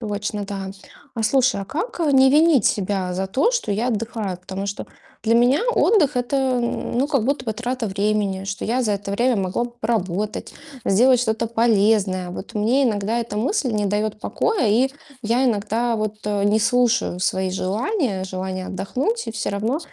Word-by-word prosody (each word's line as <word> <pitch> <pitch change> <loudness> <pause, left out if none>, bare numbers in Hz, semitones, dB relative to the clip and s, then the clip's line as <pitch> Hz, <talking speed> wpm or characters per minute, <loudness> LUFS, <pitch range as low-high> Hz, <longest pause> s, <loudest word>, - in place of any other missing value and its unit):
Точно, 205 -1 -3
да. 195 -1 -5 0.4
А 225 - -2
слушай, 250 -1 +2
а - - -4
как, 345 - -4
э, 310 -3 +2
не 265 0 +6
винить 300 -2 +4
себя 190 -2 0
за 190 +1 -2
то, 265 - +2
что 480 - -1
я 220 +5 0
отдыхаю? 220 -4 -3
Потому 190 +2 -6
что 200 0 -5 0.4
для 230 +1 +2
меня 245 - +4
отдых 320 - +3
это, 260 0 0
ну, 240 +2 -1
как 275 -7 0
будто 265 0 -1
бы 220 - 0
трата 245 +1 -3
времени, 200 -1 -1
что 195 0 -4
я 250 +3 +1
за 215 -4 +1
это 200 0 -4
время 240 +4 +2
могла 195 +4 -1
б 240 - -7
поработать, 210 -2 -2 0.3
сделать 245 +6 +4
что-то 230 -1 0
полезное. 210 -5 +2
Вот 185 +5 -8
мне 230 +5 +2
иногда 215 0 0
эта 215 -3 -4
мысль 265 - 0
не 210 -1 0
дает 210 +2 -1
покоя, 420 - 0
и 245 +6 +3 0.3
я 235 +4 +1
иногда, 230 +1 0
вот, 215 -1 -2
э, 205 -1 0
не 205 +1 +3
слушаю 240 -5 +2
свои 190 0 0
желания, 210 - -1
желания 185 0 -4
отдохнуть 275 - -2
и - - -3
всё 220 - -3
равно 220 +8 -1
220 Hz, 180 wpm, -22 LUFS, 200-250 Hz, 0.4 s, не